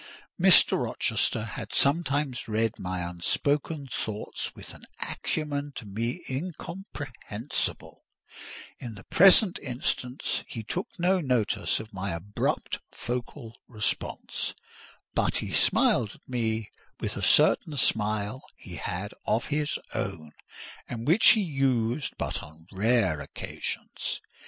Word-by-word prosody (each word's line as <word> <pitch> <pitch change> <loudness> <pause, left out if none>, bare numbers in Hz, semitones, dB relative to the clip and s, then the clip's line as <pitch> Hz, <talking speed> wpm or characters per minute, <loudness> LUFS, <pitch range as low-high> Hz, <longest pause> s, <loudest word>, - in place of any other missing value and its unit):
Mr. - - +7
Rochester 115 -1 0
had 105 - -6
sometimes 140 -3 +2
read 110 0 0
my 90 -1 -2
unspoken 140 - 0 0.2
thoughts 110 -1 -4
with - - -8
an - - -14 0.2
acumen 145 -2 -2
to 115 - -6
me 115 - -3
incomprehensible: 145 - -4 0.8
in 115 -4 -6
the 100 - -11
present 190 - +6
instance 125 0 -2
he 115 - -6
took 180 - -3
no 185 +2 +3
notice 125 -7 +1
of 110 0 -9
my 95 -1 -3
abrupt 95 +5 -1 0.2
vocal 120 0 -4
response; 110 -5 -2 0.6
but - - +1
he - - -3
smiled 110 -4 +3
at - - -23
me 115 -3 -1 0.3
with - - -1
a - - -4
certain 150 -3 +4
smile 105 +1 +1
he - - -9
had 95 +4 -4
of 115 - +2
his 150 0 0 0.2
own, 80 -1 -3 0.6
and 115 -1 -4
which 175 - +7
he 220 - +2
used 135 -4 0
but - - -2
on 80 +2 -13
rare 100 -6 +2
occasions. - - -4
120 Hz, 120 wpm, -28 LUFS, 105-145 Hz, 0.8 s, Mr